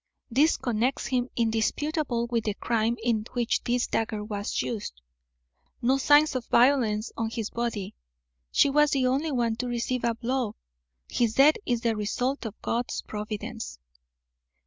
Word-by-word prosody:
This 290 Hz, +7 st, +4 dB
connects 240 Hz, +2 st, -1 dB
him 255 Hz, -1 st, 0 dB
indisputably 235 Hz, +3 st, 0 dB
with 230 Hz, -2 st, 0 dB
the 210 Hz, -2 st, -1 dB
crime 230 Hz, +1 st, 0 dB
in 225 Hz, -3 st, +1 dB
which 240 Hz, -1 st, 0 dB
this 245 Hz, 0 st, +1 dB
dagger 215 Hz, -2 st, -2 dB
was 205 Hz, -1 st, -2 dB
used. 210 Hz, -, -5 dB, 0.8 s
No 260 Hz, +3 st, +2 dB
signs 290 Hz, +1 st, +5 dB
of 250 Hz, -2 st, -3 dB
violence 235 Hz, -4 st, +3 dB
on 225 Hz, -1 st, -1 dB
his 225 Hz, -2 st, -4 dB
body. 230 Hz, -5 st, -3 dB, 0.6 s
She -, -, +5 dB
was 295 Hz, +1 st, +4 dB
the 270 Hz, -3 st, +1 dB
only 275 Hz, +5 st, +1 dB
one 235 Hz, -4 st, 0 dB
to 250 Hz, -, -3 dB
receive 240 Hz, +1 st, -2 dB
a 235 Hz, -1 st, +1 dB
blow. 235 Hz, -2 st, -2 dB, 0.5 s
His 230 Hz, -2 st, 0 dB
death 290 Hz, +3 st, +6 dB
is 240 Hz, -2 st, +1 dB
the 230 Hz, -1 st, +1 dB
result 245 Hz, +5 st, -1 dB
of 215 Hz, -, -10 dB
God's 240 Hz, +1 st, -2 dB
providence." 210 Hz, -, -5 dB
235 Hz, 150 wpm, -27 LUFS, 220-255 Hz, 0.8 s, death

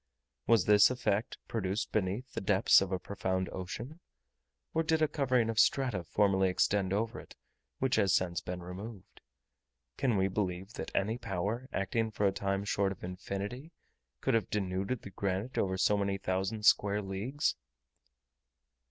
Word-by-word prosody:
Was 115 Hz, -6 st, +4 dB
this 105 Hz, -1 st, +7 dB
effect 115 Hz, -3 st, -1 dB
produced 100 Hz, -2 st, -2 dB
beneath 105 Hz, +5 st, -1 dB
the -, -, -3 dB
depths 95 Hz, 0 st, +5 dB
of 95 Hz, -1 st, -2 dB
a 95 Hz, -, +1 dB
profound 95 Hz, -1 st, -2 dB
ocean? 115 Hz, -, -6 dB, 0.7 s
or 165 Hz, -, +2 dB
did 160 Hz, 0 st, +1 dB
a 155 Hz, -, +3 dB
covering 130 Hz, -6 st, +1 dB
of 115 Hz, -1 st, 0 dB
strata 125 Hz, -10 st, +3 dB
formerly 95 Hz, +1 st, +2 dB
extend 95 Hz, +1 st, +1 dB
over 110 Hz, +4 st, -1 dB
it, -, -, -13 dB, 0.4 s
which 130 Hz, -1 st, +1 dB
has 95 Hz, -, +3 dB
since 85 Hz, -2 st, +1 dB
been 90 Hz, -1 st, -6 dB
removed? 95 Hz, +3 st, -9 dB, 0.8 s
Can 125 Hz, -6 st, +1 dB
we 95 Hz, 0 st, +3 dB
believe 95 Hz, +1 st, -3 dB
that -, -, -5 dB
any 110 Hz, +5 st, 0 dB
power, 110 Hz, +3 st, -3 dB
acting 110 Hz, +3 st, 0 dB
for 105 Hz, -1 st, -1 dB
a 100 Hz, -, +4 dB
time 100 Hz, 0 st, -1 dB
short 100 Hz, -1 st, +1 dB
of 95 Hz, -, -9 dB
infinity, 100 Hz, -, -5 dB, 0.5 s
could 135 Hz, -, +1 dB
have 115 Hz, -5 st, +1 dB
denuded 100 Hz, +3 st, -2 dB
the 100 Hz, -, -9 dB
granite 100 Hz, +6 st, -2 dB
over 95 Hz, -1 st, 0 dB
so 100 Hz, +3 st, +3 dB
many 100 Hz, -1 st, 0 dB
thousand 95 Hz, +3 st, -2 dB
square 105 Hz, -1 st, +4 dB
leagues? 110 Hz, +10 st, -1 dB
100 Hz, 160 wpm, -32 LUFS, 95-115 Hz, 0.8 s, this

